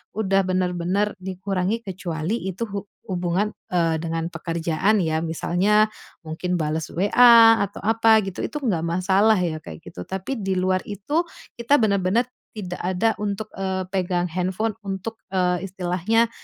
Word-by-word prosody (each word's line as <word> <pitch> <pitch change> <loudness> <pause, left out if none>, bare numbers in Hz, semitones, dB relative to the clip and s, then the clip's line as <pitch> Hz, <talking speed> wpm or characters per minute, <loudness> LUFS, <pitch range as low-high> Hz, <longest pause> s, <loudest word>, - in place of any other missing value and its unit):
udah 195 -2 +2
bener-bener 185 +2 0
dikurangi, 190 +3 -2
kecuali 185 +1 -3
itu 190 +4 -3
hu 200 0 -5 0.2
hubungan, 180 +3 0 0.2
eee, 165 -2 +2
dengan 165 0 -3
pekerjaan 170 +5 0
ya, 160 -1 0
misalnya 195 +6 +2 0.3
mungkin 170 +3 -3
bales 155 +1 -2
WA 225 +4 +7
atau 200 - -11
apa 225 0 +4
gitu, 190 -2 -5
itu 300 - -5
enggak 175 -10 0
masalah 190 +5 +3
ya, 170 -3 -1
kayak 80 - -10
gitu. 90 - -8
Tapi 190 +8 -4
di 195 -2 -1
luar 185 0 +1
itu, 250 - -1 0.3
kita 235 +5 +4
benar-benar 200 +3 +2 0.3
tidak 180 -4 -5
ada 185 +5 +1
untuk, 210 +1 -3
eee, 190 -1 -2
pegang 180 -2 0
handphone 185 +5 -1
untuk, 195 +3 -4 0.2
eee, 180 0 +1
istilahnya, 190 +5 0
190 Hz, 140 wpm, -23 LUFS, 175-210 Hz, 0.3 s, WA